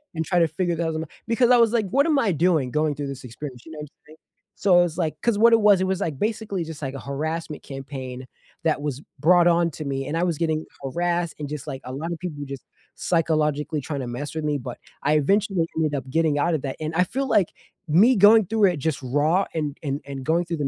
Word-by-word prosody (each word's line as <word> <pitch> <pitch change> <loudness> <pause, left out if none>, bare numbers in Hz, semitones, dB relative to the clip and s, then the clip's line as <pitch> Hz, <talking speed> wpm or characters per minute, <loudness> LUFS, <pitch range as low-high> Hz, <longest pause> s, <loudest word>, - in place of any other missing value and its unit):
and 160 0 -2
try 180 0 +2
to 165 -2 +3
figure 175 +2 -1
that 165 0 -1
out", 160 -1 -3 0.2
because 240 +1 +3
I 245 - +7
was 230 -2 +4
like, 220 -4 +1
"What 280 +7 +3
am 300 -3 +3
I 210 -8 +1
doing 155 -6 +2
going 150 -1 0
through 145 0 -4
this 135 -1 -7
experience?", 125 +1 -8
you 160 - -11
know 155 - -9
what 150 -1 -7
I'm - - -53
saying? 155 +1 -16 0.4
So 175 -3 +4
it's, 165 -2 -3
like, 155 -4 -1
'cause 235 -3 +1
what 230 +1 +6
it 230 - +6
was 205 -3 +5
it 190 - +2
was, 190 0 -1
like, 155 -7 -3
basically 210 -4 -2
just, 160 -1 -8
like, 135 - -3
a 135 - -5
harassment 155 +2 -4
campaign 130 -2 -7 0.4
that 160 -2 +1
was 145 -2 -3 0.2
brought 175 +3 +5
on 170 -1 +3
to 155 0 -7
me, 135 -1 -2
and 150 - -3
I - - 0
was 170 -4 0
getting 160 -1 -1 0.2
harassed 170 +4 -1
and 145 -1 -5
just, 150 -3 -6
like, 135 -2 -5
a 130 - -6
lotta 165 +5 -4
people 155 -6 -5
just 140 -1 -8 0.3
psychologically 155 -2 0
trying 140 0 -4
to 125 - -5
mess 140 +6 -5
with 160 - -3
me, 150 -1 0
but 125 -1 -7 0.3
I 150 - +2
eventually 195 +3 +2
ended 155 -2 +1
up 135 -2 -4
getting 160 -2 +2
out 170 +4 +1
of 145 - -2
that, 135 - -3
and 155 +1 -4
I 180 +2 +3
feel 270 +7 -2
like 195 -8 +3 0.4
me 200 +12 +5
going 210 +1 +7
through 215 +2 +2
it 180 -5 +2
just 140 0 -2
raw 150 +9 +1
and 150 -3 -2
and 140 0 -2
and 135 -1 -6
going 170 +2 +1
through 170 -1 -3
the 145 - 0
160 Hz, 255 wpm, -24 LUFS, 145-180 Hz, 0.4 s, I